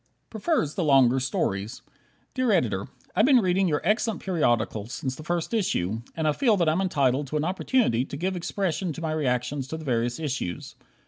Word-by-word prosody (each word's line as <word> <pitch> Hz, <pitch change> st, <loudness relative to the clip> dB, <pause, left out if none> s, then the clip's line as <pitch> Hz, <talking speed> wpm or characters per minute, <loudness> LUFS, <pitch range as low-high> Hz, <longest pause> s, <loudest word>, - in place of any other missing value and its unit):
Prefers 220 Hz, -, 0 dB
the 180 Hz, -, -1 dB
Longer 135 Hz, -4 st, +5 dB
Stories 110 Hz, -3 st, -2 dB, 0.5 s
Dear 255 Hz, -3 st, +1 dB
Editor: 105 Hz, -, +1 dB, 0.3 s
I've 215 Hz, +6 st, +4 dB
been 275 Hz, -2 st, +6 dB
reading 190 Hz, -3 st, +2 dB
your 150 Hz, -3 st, 0 dB
excellent 215 Hz, +2 st, +1 dB
periodical 120 Hz, -, 0 dB
since 130 Hz, +2 st, -4 dB
the -, -, -10 dB
first 175 Hz, +4 st, -2 dB
issue, 115 Hz, -, 0 dB, 0.2 s
and 160 Hz, -1 st, 0 dB
I -, -, +4 dB
feel 220 Hz, -, +2 dB
that 170 Hz, -3 st, +1 dB
I'm 160 Hz, +4 st, +2 dB
entitled 140 Hz, -6 st, +1 dB
to 150 Hz, -, -2 dB
an 150 Hz, -, -1 dB
opportunity 185 Hz, -, +1 dB
to 140 Hz, -, -7 dB
give 185 Hz, +4 st, -1 dB
expression 180 Hz, -1 st, -2 dB
to 165 Hz, -, -8 dB
my 160 Hz, -1 st, -2 dB
reactions 135 Hz, -2 st, -1 dB
to 160 Hz, -, -5 dB
the 160 Hz, -, -9 dB
various 120 Hz, -1 st, 0 dB
issues. 130 Hz, -, -4 dB
155 Hz, 190 wpm, -26 LUFS, 125-190 Hz, 0.5 s, been